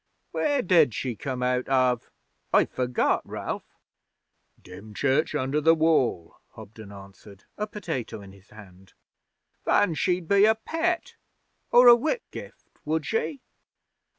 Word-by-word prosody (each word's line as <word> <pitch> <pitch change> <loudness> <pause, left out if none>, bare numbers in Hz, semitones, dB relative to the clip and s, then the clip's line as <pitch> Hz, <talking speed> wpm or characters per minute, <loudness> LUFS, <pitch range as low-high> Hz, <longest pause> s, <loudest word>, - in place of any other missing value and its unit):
'Where 285 -3 0
did 165 - +3
she 125 -3 -3
come 130 +1 -4
out 125 0 0
of? 130 -2 +1 0.4
I've - - +3
forgot, 125 -1 0
Ralph.' - - -7 0.8
'Dymchurch 130 - -2
under 145 +2 -1
the 165 +2 +5
Wall,' 145 - 0 0.2
Hobden 110 -1 -12
answered, 100 0 -14
a 210 - -3
potato 165 - -5
in 100 -1 -12
his 100 +1 -20
hand. 95 -3 -16 0.7
'Then 180 -5 +2
she'd 180 +1 -1
be 200 +2 +5
a 220 +1 +4
Pett 330 +9 -3 0.5
or 245 +1 +6
a 240 - +11
Whitgift, 315 - -5 0.2
would 155 0 -2
she?' 255 +5 -2
140 Hz, 125 wpm, -25 LUFS, -, 0.8 s, a